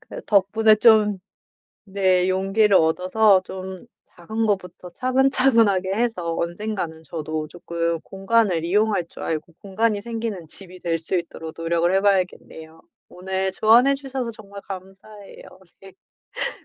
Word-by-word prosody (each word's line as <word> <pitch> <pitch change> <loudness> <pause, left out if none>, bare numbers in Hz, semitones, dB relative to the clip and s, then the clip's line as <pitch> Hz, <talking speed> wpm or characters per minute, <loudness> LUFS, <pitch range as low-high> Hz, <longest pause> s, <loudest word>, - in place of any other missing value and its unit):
그래도 - - -11
덕분에 215 +2 +4
좀 215 -3 +4 0.7
네 190 -2 +1
용기를 195 +2 +3
얻어서 185 +5 +3
좀 190 0 -8 0.3
작은 220 +6 -3
거부터 180 -3 -3
차분차분하게 250 -6 +2
해서 200 -7 -1
언젠가는 175 -2 -4
저도 155 -1 -5
쪼끔 170 -1 -3
공간을 195 -3 +1
이용할 200 0 +1
줄 - - -12
알고 160 +1 -4
공간이 205 +1 -1
생기는 225 -6 -5
집이 185 +2 -13
될 165 -1 -1
수 165 +3 -1
있도록 165 -2 -6
노력을 170 +2 0
해 195 - +4
봐야겠네요. 180 -5 -2 0.3
오늘 190 +1 -3
조언해 240 +7 +4
주셔서 265 -3 -5
정말 200 -2 -11
감사해요. 195 +2 -11 1.2
네. - - -19
190 Hz, 295 characters per minute, -22 LUFS, 175-220 Hz, 1.2 s, 덕분에